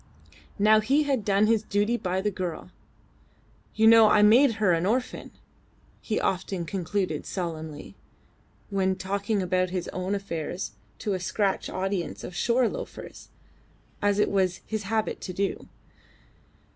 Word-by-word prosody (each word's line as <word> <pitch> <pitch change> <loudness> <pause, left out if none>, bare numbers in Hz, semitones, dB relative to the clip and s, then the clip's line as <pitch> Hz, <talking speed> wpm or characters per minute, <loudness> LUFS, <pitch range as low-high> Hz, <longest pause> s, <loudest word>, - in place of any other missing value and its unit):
Now 215 +1 +5
he 275 +8 +2
had 270 -6 0
done 200 +1 +3
his 220 -1 +3
duty 210 +2 0
by 185 -4 -2
the 210 +1 0
girl. 180 -4 -5 1.0
"You 220 - +3
know 225 -1 +8
I 210 0 +5
made 235 +5 +6
her 210 -5 +2
an 165 +2 0
orphan," 250 +4 -2 0.7
he 215 - -1
often 185 -1 -2
concluded 185 -2 -2
solemnly, 160 -5 -5 0.8
when 190 -1 +1
talking 200 +2 -2
about 185 0 +1
his 180 -1 -3
own 185 +2 -2
affairs 175 - -4 0.3
to 205 - -2
a 185 - -2
scratch 195 +2 -1
audience 190 -2 -3
of 180 - -7
shore 240 +5 +2
loafers - - -8 0.7
as 205 0 +2
it 210 - +2
was 185 -2 +1
his 215 -2 -4
habit 220 -1 -1
to 185 - -5
do. 195 +2 -2
200 Hz, 145 wpm, -26 LUFS, 185-215 Hz, 1.0 s, know